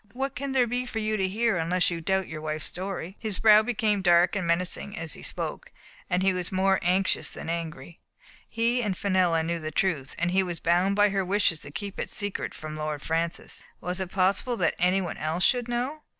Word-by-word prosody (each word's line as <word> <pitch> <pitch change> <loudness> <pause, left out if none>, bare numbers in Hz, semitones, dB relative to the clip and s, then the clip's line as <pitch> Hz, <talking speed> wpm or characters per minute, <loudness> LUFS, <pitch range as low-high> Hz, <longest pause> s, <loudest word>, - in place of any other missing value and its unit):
What 270 +1 -2
can 275 0 -3
there 255 -2 +4
be 245 +2 -2
for 230 - -5
you 215 0 0
to 190 -2 +1
hear, 220 +1 +1
unless 175 +2 +2
you 170 -1 -3
doubt 190 +2 0
your 155 -1 -6
wife's 155 0 -3
story?" 190 0 -4
His 215 -4 -1
brow 215 -1 +7
became 220 -3 0
dark 175 0 +4
and 185 -4 -1
menacing 180 +4 -1
as 160 -1 -2
he - - -7
spoke, - - -3 0.4
but 180 +1 +1
he 190 0 +3
was 180 -1 -1
more 190 0 +2
anxious 185 +2 +2
than - - -7
angry. 165 -2 -6 0.5
He 235 +2 +1
and 200 -5 -1
Fenella 180 -4 +2
knew 170 +1 -2
the 155 -1 -4
truth, 155 -4 -1
and 175 +1 0
he 190 +1 +3
was 175 -3 -3
bound 180 +4 +2
by 205 0 +5
her 195 -1 0
wishes 185 -3 +1
to - - -8
keep 200 +5 -6
it - - -3
secret 205 -2 -4
from 155 0 -7
Lord 155 -1 -3
Francis; 165 +1 -2 0.2
was 180 +1 -3
it 190 -2 -3
possible 195 +6 +1
that 165 -5 +2
anyone 180 0 +1
else 160 +4 -1
should 245 0 +3
know? 250 +6 -2
185 Hz, 215 wpm, -27 LUFS, 170-210 Hz, 0.5 s, brow